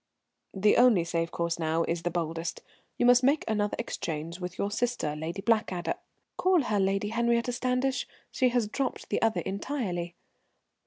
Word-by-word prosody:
"The 205 +2 +4
only 240 -8 +6
safe 165 0 -1
course 170 0 -2
now 160 +1 +1
is 170 0 -2
the 175 - -1
boldest. 165 -1 -3 0.3
You - - +2
must 245 0 +7
make 280 +4 +3
another 210 -1 0
exchange 165 -6 -4
with 180 0 -6
your 200 - -1
sister, 210 -9 -1
Lady 165 +5 -5
Blackadder 195 -7 +1 0.3
" - - -51
"Call 365 -4 +4
her 210 -4 0
Lady 195 +1 +1
Henriette 235 +1 +1
Standish. 255 +2 0 0.2
She 255 -2 +2
has 240 -3 +1
dropped 260 +4 -3
the - - 0
other 225 -1 +2
entirely." 190 -6 -3
205 Hz, 165 wpm, -28 LUFS, 170-245 Hz, 0.3 s, must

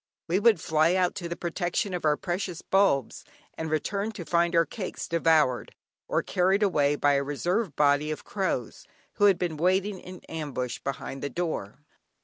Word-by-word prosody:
We 175 +3 +2
would 215 -4 +4
fly 160 +2 +2
out 180 -1 +2
to 175 -3 -5
the 170 - -3
protection 175 +3 -2
of 175 -3 -3
our 150 -1 +3
precious 175 -1 -4
bulbs, 190 - +1 0.3
and 160 0 -4
return 200 +7 -1
to 175 - -7
find 170 0 +1
our 165 0 +5
cakes 185 +5 -6
devoured 160 -6 +2 0.3
or - - 0
carried 190 +3 +2
away, 145 -7 +2
by 145 0 +3
a 140 0 +2
reserve 170 +5 -1
body 145 +1 +3
of 155 - -4
crows, 185 - -3 0.3
who 205 - +4
had 195 -3 +5
been 175 -3 -2
waiting 190 +4 +1
in 185 0 -11
ambush 140 -6 -4
behind 135 0 -5
the 145 - -3
door. 150 - -4
170 Hz, 175 wpm, -27 LUFS, 150-185 Hz, 0.3 s, our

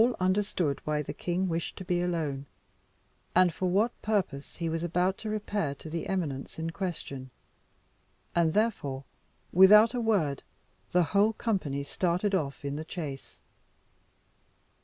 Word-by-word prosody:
All 240 +1 +4
understood 185 -5 +1
why 150 0 0
the - - -5
king 180 +2 -1
wished 165 -1 -2
to 185 - -7
be 175 -1 +1
alone, 155 -6 -2 0.9
and 180 -2 +5
for 185 +2 -1
what 210 +6 +1
purpose 190 -10 -1
he 170 - -3
was 165 0 -1
about 180 +3 +1
to 220 - -4
repair 205 -8 -1
to 155 +2 -9
the 165 0 -3
eminence 155 -8 -3
in 165 +1 -3
question, 155 -8 -5 1.0
and 165 -2 +3
therefore, 170 -12 0 0.5
without 210 +6 +8
a 245 - -1
word, 190 -12 +1 0.5
the 180 0 +4
whole 205 +2 +4
company 185 -13 -1
started 180 +6 0
off 145 -6 -1
in 140 +1 -2
the 155 - -4
chase. 155 -5 -6
175 Hz, 145 wpm, -29 LUFS, 150-200 Hz, 1.0 s, without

